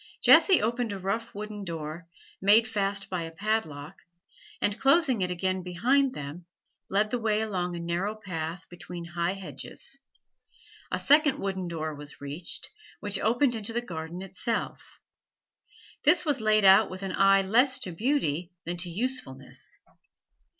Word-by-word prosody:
Jessie 380 - +7
opened 235 0 0
a - - -4
rough 195 +5 -3
wooden 210 0 -6
door, 165 -1 -6 0.3
made 210 +4 +6
fast 200 -2 +1
by 180 -2 -3
a 165 - -4
padlock, 165 -4 -3 0.6
and, 205 0 0
closing 275 - +3
it 180 - 0
again 185 +1 -1
behind 255 +10 +1
them, 150 +5 -7 0.4
led 210 +2 +1
the 245 - 0
way 215 -2 +1
along 180 -5 -2
a - - -5
narrow 175 +5 -2
path 175 -4 -5
between 175 0 -8
high 170 +1 -1
hedges, 190 - -7 0.9
a - - 0
second 295 -1 +4
wooden 190 -4 -3
door 155 -2 -3
was 145 0 -9
reached, 145 +5 -6 0.3
which 205 -1 -2
opened 245 +3 +2
into 225 0 -4
the 240 - +1
garden 170 -4 -6
itself. 195 +4 -4 1.1
This 335 +4 +4
was 290 -6 +1
laid 215 -1 +3
out 195 +3 +7
with 185 +1 -7
an 190 -1 -3
eye 195 0 +5
less 245 +7 +4
to 180 - -2
beauty 175 - -1
than 175 +1 -3
to 175 +1 -3
usefulness. 170 - -5
195 Hz, 150 wpm, -28 LUFS, 170-225 Hz, 1.1 s, Jessie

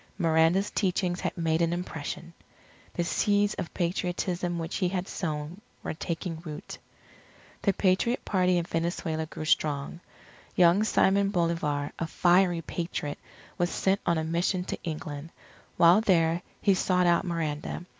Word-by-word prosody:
Miranda's 165 +3 +3
teachings 180 -2 0
had - - -3
made 165 -1 +1
an 170 0 +2
impression. 170 -1 -5 0.6
The 175 - 0
seeds 205 +3 +2
of 165 - -5
Patriotism 175 0 -1
which 165 +1 -3
he 185 -3 +1
had 185 0 -2
sown 155 +2 -4 0.2
were - - -3
taking 165 +1 -4
root. 155 -3 -8 0.8
The 200 - +3
Patriot 195 +7 +1
Party 185 -2 +2
in 170 - +1
Venezuela 165 -1 -2
grew 155 - -7
strong. 150 0 0 0.6
Young 180 +3 +5
Simon 200 -2 +3
Bolivar, 165 -6 0
a 165 - -1
fiery 175 0 +3
Patriot, 160 -3 -4 0.4
was 175 0 +2
sent 195 +2 +1
on 170 -1 +1
a 160 - 0
mission 175 +3 0
to - - -6
England. 155 -2 -5 0.5
While 175 +5 +7
there, 170 -5 +3 0.2
he 200 - +5
sought 180 -1 +2
out 170 -1 +4
Miranda. 165 -1 -3
175 Hz, 145 wpm, -28 LUFS, 160-185 Hz, 0.8 s, While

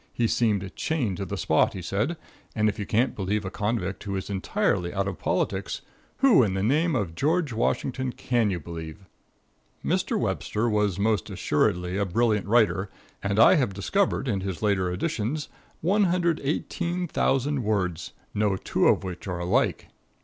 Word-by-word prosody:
He 120 - +1
seemed 105 -5 0
chained 125 - -1
to 100 - -3
the 100 +2 -4
spot, 80 -2 +2
he 95 - -6
said, 105 - -1 0.4
and 110 -1 +2
if 105 - -1
you 100 - -3
can't 120 +4 +1
believe 100 +1 -1
a 95 - -4
convict, 105 -2 -2
who 100 -2 -3
is 95 +1 -4
entirely 95 -2 0
out 100 0 -1
of 95 - -4
politics, - - -1 0.4
who 260 - +7
in 100 -5 +1
the 95 - -1
name 155 +7 +2
of 100 -9 -1
George 150 - 0
Washington 130 +3 -1
can 120 -3 0
you 90 -3 -2
believe? 80 +3 -8 0.8
Mr. - - +1
Webster 110 +3 -1
was 105 -4 +1
most 105 +1 +1
assuredly 90 +1 0
a 100 - +1
brilliant 105 +1 +1
writer, 105 -4 +3 0.3
and 100 0 -1
I 115 - +8
have 125 -9 0
discovered 180 - 0
in 100 -5 0
his 95 0 -4
later 95 -4 +1
editions 120 - -2 0.3
118,000 170 - 0
words, 90 -6 -1 0.2
no 105 -2 +1
two - - +1
of - - +3
which 90 0 -6
are 90 -2 -2
alike. 85 +1 0
105 Hz, 165 wpm, -26 LUFS, 95-130 Hz, 0.8 s, I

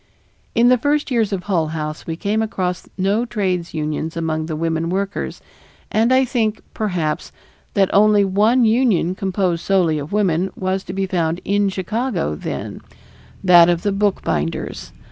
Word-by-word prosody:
In 240 +1 +5
the 250 -1 +4
first 290 +2 0
years 225 -4 +1
of 190 -2 -2
Hull 170 -6 0
House 155 0 -5
we 165 - -2
came 205 +6 -1
across 185 -5 -3
no 200 +4 +1
trades 185 -8 -2
unions 155 +1 -3
among 160 -1 -2
the 160 - -3
women 165 +1 -1
workers, 195 +2 -3 0.5
and 225 +3 +2
I 260 +1 +4
think, 225 -4 0
perhaps, 180 -8 -2 0.4
that 195 -2 +2
only 205 0 +5
one 215 +6 +3
union, 220 -6 +2
composed 185 -3 -1
solely 175 -6 +2
of 145 +1 -7
women, 190 -3 +1
was 190 0 -2
to 185 - -6
be 195 0 -1
found 170 -3 -1
in 200 0 +2
Chicago 195 - -2
then 75 - -5 0.6
that 175 -2 +7
of 170 -1 0
the 205 - +1
bookbinders. 85 - -2
190 Hz, 160 wpm, -20 LUFS, 165-215 Hz, 0.6 s, that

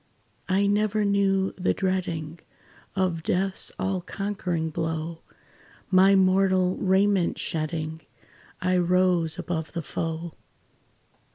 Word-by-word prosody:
"I 195 +2 +3
never 210 +1 +1
knew 195 -1 +2
the 180 - +1
dreading 175 -4 -2 0.6
Of 185 -4 0
death's 190 +3 0
all 190 -1 -1
conquering 180 -4 -3
blow; 160 0 -3 0.7
My 190 +1 +6
mortal 185 -1 +3
raiment 195 -1 +2
shedding, 160 0 -3 0.6
I 185 0 +1
rose 180 -2 +2
above 160 -3 -4
the 170 - -3
foe. 165 +1 -4
185 Hz, 100 wpm, -26 LUFS, 165-195 Hz, 0.7 s, My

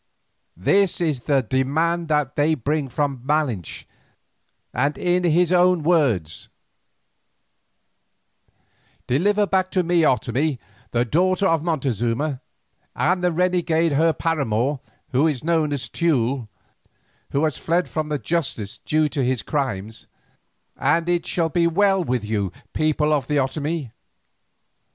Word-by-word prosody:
This 195 - +2
is 155 -6 0
the 135 +1 +1
demand 155 +8 0
that 150 -4 0
they 155 +2 +2
bring 145 +1 -2
from 140 -1 -2
Malinche, 135 - -1 0.9
and 140 +5 0
in 180 0 +1
his 175 +1 +3
own 180 -2 +4
words: 120 - +1 2.6
"'Deliver 205 +11 +2
back 190 -1 0
to 185 -1 +1
me 175 0 +2
Otomie, 135 0 +1 0.3
the 120 +1 0
daughter 185 - +1
of 165 -4 +2
Montezuma, 135 - -1 0.5
and 180 +8 +1
the 180 - +2
renegade 170 -2 +1
her 160 +4 +3
paramour, 140 -5 -1 0.3
who 135 +5 +3
is 145 -5 -2
known 160 -2 +1
as 140 -3 -3
Teule, 140 -7 +1
and 120 -5 -8 0.9
who 140 - +1
has 155 -4 0
fled 170 +2 0
from 155 -1 -3
the 150 - 0
justice 140 -11 -3
due 155 0 +1
to 140 -2 -1
his 125 -1 0
crimes, 110 -7 -3 0.7
and 170 0 +1
it 175 -1 0
shall 165 -2 0
be 170 +1 +2
well 195 +2 +2
with 125 -7 -2
you, 105 -4 -1 0.2
people 155 0 +1
of 140 -4 0
the 150 - -1
Otomie. 145 0 -2
150 Hz, 130 wpm, -22 LUFS, 130-170 Hz, 2.6 s, own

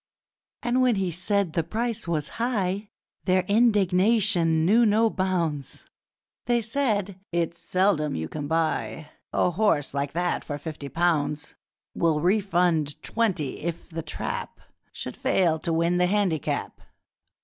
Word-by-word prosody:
And 245 +2 +2
when 250 -3 +4
he 190 -3 -1
said 185 0 0
the 165 - +1
price 230 +2 -2
was 155 -3 -1
high, 205 -4 -1 0.4
Their 185 -1 +3
indignation 195 -5 +3
knew 225 +6 +5
no 220 +1 +3
bounds. 170 -7 -2 0.6
They 240 -1 +2
said, 215 -6 -1
'It's 170 0 -1
seldom 180 -6 +1
you 80 0 -3
can 145 - -5
buy 155 -4 -1 0.2
A 180 - +2
horse 175 -8 +1
like 140 0 -2
that 175 +1 -1
for 145 - -4
fifty 150 -1 -7
pounds! 150 -3 0 0.4
We'll 160 -3 +1
refund 175 -5 +1
twenty 190 - -1
if 170 +1 -5
The 165 0 -4
Trap 155 - -5 0.3
Should - - -6
fail 165 -4 +2
to 165 - -2
win 170 +2 +2
the 180 0 +3
handicap!' 190 -6 -1
180 Hz, 135 wpm, -26 LUFS, 160-205 Hz, 0.6 s, knew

